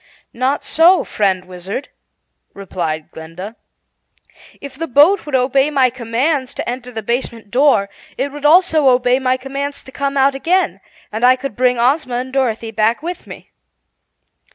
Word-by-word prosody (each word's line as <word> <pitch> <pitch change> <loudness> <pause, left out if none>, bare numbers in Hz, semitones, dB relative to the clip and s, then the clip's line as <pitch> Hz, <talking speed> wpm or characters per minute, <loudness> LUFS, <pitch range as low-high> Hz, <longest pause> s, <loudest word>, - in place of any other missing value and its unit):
"Not 260 +4 -1
so, 345 +4 +4
friend 190 -3 -1
Wizard," 185 +8 -7 0.7
replied 170 -5 -4
Glinda. 170 +7 -9 1.0
"If 280 -1 -9
the 330 +4 -4
boat 305 +8 +4
would 285 - -1
obey 270 +2 +2
my 265 -4 +2
commands 255 +3 -2
to - - -5
enter 250 +1 -5
the 220 -2 -6
basement 230 -2 -3
door, 250 -6 +3 0.3
it 275 +2 -2
would 290 0 -9
also 315 -2 +4
obey 250 0 +3
my 255 -1 +1
commands 275 +2 -5
to 265 - -13
come 280 +1 -2
out 275 +1 +4
again, 350 +7 0 0.3
and 220 +3 -4
I 255 +1 +6
could 260 -3 -6
bring 250 0 +2
Ozma 255 +1 +1
and 255 +1 -4
Dorothy 230 -4 -1
back 225 +5 0
with 350 +2 -6
me." - - -12
255 Hz, 155 wpm, -17 LUFS, 230-280 Hz, 1.0 s, I